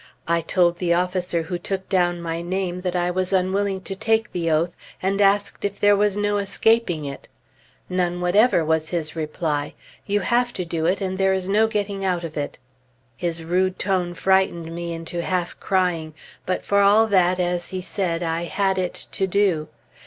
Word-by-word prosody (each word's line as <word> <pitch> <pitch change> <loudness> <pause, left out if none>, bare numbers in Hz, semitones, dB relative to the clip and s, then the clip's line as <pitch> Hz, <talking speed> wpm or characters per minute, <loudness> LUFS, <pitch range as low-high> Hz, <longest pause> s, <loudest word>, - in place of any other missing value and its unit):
I 170 0 +2
told 175 0 +2
the 170 -2 +2
officer 180 -1 0
who 175 +1 -4
took 190 0 -4
down 175 -2 +1
my 165 0 -3
name 180 0 -2
that 180 -1 -2
I 175 0 +1
was 185 0 -1
unwilling 190 +1 +1
to 195 +1 -5
take 220 +2 +1
the 170 -2 -1
oath, 165 +2 +1 0.2
and 195 +2 0
asked 200 +1 +2
if 200 0 -2
there 205 0 +5
was 205 0 +2
no 205 0 +1
escaping 200 -4 +1
it. 140 -1 -7 0.6
"None 175 -1 -1
whatever" 180 0 +3
was 160 0 +1
his 160 -3 -3
reply. 155 -2 -2 0.3
"You 205 0 +1
have 240 +5 +2
it - - -14
to 180 - -2
do, 165 -1 -1
and 190 +1 -1
there 190 0 +3
is 190 -1 -1
no 215 +3 +3
getting 205 -2 -2
out 180 -2 0
of 165 -2 -6
it." 145 -1 -4 0.6
His 170 +3 -3
rude 185 +3 +1
tone 180 -2 -1
frightened 190 -4 +1
me 170 0 -4
into 165 +1 -4
half 180 0 -2
crying; 175 -5 0 0.3
but 185 - -1
for 200 - +2
all 205 +3 +6
that, 185 -3 +3
as 175 -1 -1
he 185 - -4
said, 180 -2 -2
I 165 +1 -1
had 190 +2 0
it 180 -1 -3
to 190 - 0
do. 185 -5 +1
180 Hz, 190 wpm, -23 LUFS, 170-195 Hz, 0.6 s, all